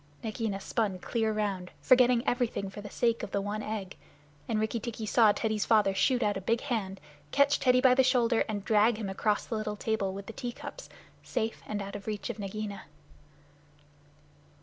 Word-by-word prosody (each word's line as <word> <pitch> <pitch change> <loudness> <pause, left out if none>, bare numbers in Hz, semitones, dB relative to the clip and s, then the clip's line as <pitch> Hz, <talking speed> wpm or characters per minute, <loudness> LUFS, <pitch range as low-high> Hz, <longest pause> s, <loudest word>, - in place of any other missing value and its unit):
Nagaina 220 -2 -2
spun 200 -1 -1
clear 220 +4 -1
round, 200 -4 -2
forgetting 250 -1 +4
everything 235 -5 0
for 205 - -8
the 205 - -8
sake 230 +1 +1
of - - -5
the 200 - -1
one 205 +2 -3
egg. 210 -3 -5 0.5
Rikki 220 +1 0
tikki 225 -1 -5
saw 220 0 +5
Teddy's 215 -1 -1
father 210 -4 +4
shoot 245 +6 +2
out 205 -1 +1
a - - -5
big 230 +5 0
hand, 210 -8 -3 0.3
catch 280 +1 +3
Teddy 250 -1 +4
by 255 -1 +6
the 260 - +5
shoulder, 245 -3 +3
and 205 -2 -3
drag 215 +1 +4
him 210 -3 -4
across 205 +2 0
the - - -6
little 215 -1 -3
table 210 -2 -1
with 195 +1 -7
the 225 - -8
tea 240 +1 -5
cups, - - -9 0.3
safe 225 -3 -3
and 205 -1 -3
out 200 +1 -7
of 200 0 -8
reach 210 -1 -3
of - - -11
Nagaina. 205 0 -5
215 Hz, 190 wpm, -29 LUFS, 205-235 Hz, 0.5 s, by